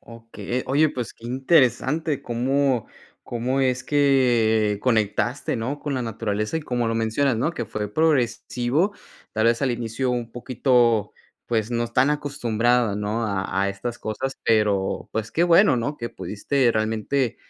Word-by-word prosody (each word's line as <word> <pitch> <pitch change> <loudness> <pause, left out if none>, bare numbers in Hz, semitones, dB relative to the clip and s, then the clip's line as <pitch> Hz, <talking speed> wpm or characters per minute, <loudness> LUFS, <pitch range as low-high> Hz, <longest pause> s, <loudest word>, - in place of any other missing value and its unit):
Okey, 115 +1 -6
oye, 145 +4 +3
pues 125 -5 -5
qué 115 - -12
interesante. 135 +2 +1
Cómo 130 +1 0 0.4
cómo 125 +3 -2
es 130 -1 +1
que 120 -7 +2
conectaste, 120 +3 0
¿no? 130 +6 -3
Con 145 -2 -3
la 130 - -1
naturaleza, 110 +2 -2
y - - -2
como 120 -4 -1
lo 115 - 0
mencionas, 115 +3 +1
¿no? 125 +8 0
Que 170 - -4
fue 105 -1 -5
progresivo, 135 - +1 0.4
tal 110 +1 +1
vez, 115 +2 +2
al 130 -2 +2
inicio 120 +2 -2
un 120 -2 -3
poquito, 120 -3 +1 0.4
pues, 115 0 -1
no 120 0 -1
tan 130 +5 +2
acostumbrada, 120 -6 +1
¿no? 105 +3 -2
A 95 -1 -1
a 100 - +1
estas 115 +5 -5
cosas, 130 +5 -4
pero 105 -3 +1
pues 110 0 -3
qué 170 - +2
bueno, 175 -3 +5
¿no? 140 +5 -2
Que 115 - -5
pudiste 120 +5 0
realmente 110 +3 -1
120 Hz, 155 wpm, -23 LUFS, 110-135 Hz, 0.4 s, bueno